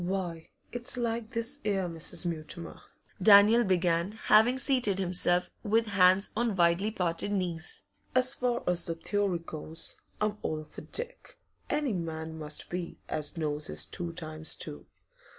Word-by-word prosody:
'Why, 175 -3 -3 0.2
it's 245 +1 0
like 230 -2 -2
this 235 +4 0
'era, 195 -3 0
Mrs. 165 +1 0
Mutimer,' 170 0 -5 0.4
Daniel 210 +4 +7
began, 180 -1 +1
having 220 +3 +4
seated 250 -7 +2
himself, 180 -1 +2
with 225 +1 +2
hands 190 -1 +4
on 230 -2 0
widely 175 +3 +3
parted 180 -2 -2
knees. 175 -4 -3 0.3
'As 255 +1 +4
far 245 -2 -1
as 175 -1 +1
the 165 - -2
theory 200 +2 0
goes, 160 -1 -5 0.2
I'm 210 0 -1
all 155 0 -3
for - - -11
Dick; - - -6 0.3
any 295 -5 0
man 160 -2 -4
must 150 -1 -5
be 175 -1 -4
as 155 +2 -2
knows 150 -1 -1
his - - -1
two 175 -2 -4
times 155 -2 -3
two. 150 -2 -5
185 Hz, 150 wpm, -30 LUFS, 165-220 Hz, 0.4 s, Daniel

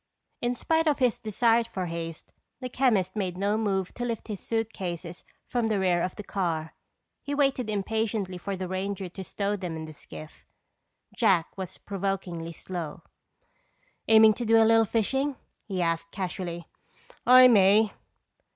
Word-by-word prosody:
In 240 +1 0
spite 320 +5 +1
of 295 - +3
his 250 -4 +1
desire 230 +2 +2
for 200 -5 -4
haste, 165 -1 -6 0.3
the 255 -1 -5
chemist 220 -8 +1
made 185 -4 -2
no 200 +2 +1
move 195 -4 -1
to 245 - -5
lift 235 -2 -4
his 205 -3 -4
suitcases 185 -6 -4 0.2
from 240 -3 0
the 215 -2 +1
rear 180 -2 +2
of 180 - -2
the 210 - -7
car. 165 -6 -2 0.5
He 285 0 -3
waited 270 -5 +1
impatiently 210 -2 -2
for 195 +2 -4
the 185 0 -4
ranger 190 0 -3
to 190 +2 -8
stow 200 +2 -2
them 180 -4 -5
in 160 0 -5
the 155 - -10
skiff. 155 +1 -12 0.7
Jack 190 -8 +2
was 190 -2 -6
provokingly 190 -4 -4
slow. 170 -2 -6 1.0
"Aiming 220 -1 +7
to 240 - -5
do 225 0 +5
a 225 - +6
little 225 0 +5
fishing?" 265 +6 0 0.3
he 185 -4 -1
asked 165 0 -1
casually. 175 -3 -5 0.6
"I 255 +1 +9
may." 210 -1 +5
200 Hz, 160 wpm, -27 LUFS, 180-225 Hz, 1.0 s, I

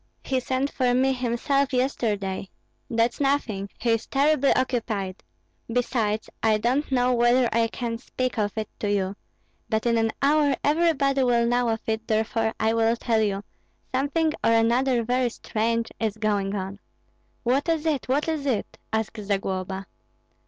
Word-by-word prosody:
"He 260 -1 0
sent 260 +2 -1
for 250 -2 +1
me 265 +1 +3
himself 260 +3 0
yesterday." 210 -7 -1 0.4
"That's 230 0 +1
nothing; 240 -8 0
he 235 - 0
is 225 0 0
terribly 280 0 +3
occupied. 220 -7 -1 0.5
Besides, 230 -3 0
I 220 -1 +3
don't 255 +7 0
know 250 -1 +3
whether 240 +1 +4
I 230 0 +3
can 230 0 -4
speak 255 -1 -3
of 205 0 -1
it 215 -1 -2
to 205 - -1
you 195 -1 0 0.5
but 220 0 0
in 230 -1 +3
an 225 0 +1
hour 290 0 +3
everybody 290 -4 +2
will 240 -2 +3
know 245 0 +2
of 225 -1 -1
it, 220 0 -2
therefore 220 +1 0
I 220 +1 +2
will 230 0 +3
tell 230 -1 +1
you 200 -2 0 0.5
something 300 +4 +1
or 230 - +4
another 235 +2 +3
very 250 +1 +1
strange 230 0 -1
is 220 -2 -1
going 205 -2 0
on." 195 +1 -4 0.6
"What 270 +7 +1
is 325 -1 0
it, 305 -4 0
what 285 +4 +1
is 310 -3 -2
it?" 235 -6 -2
asked 220 0 -2
Zagloba. 195 -1 -2
235 Hz, 160 wpm, -25 LUFS, 220-260 Hz, 0.6 s, whether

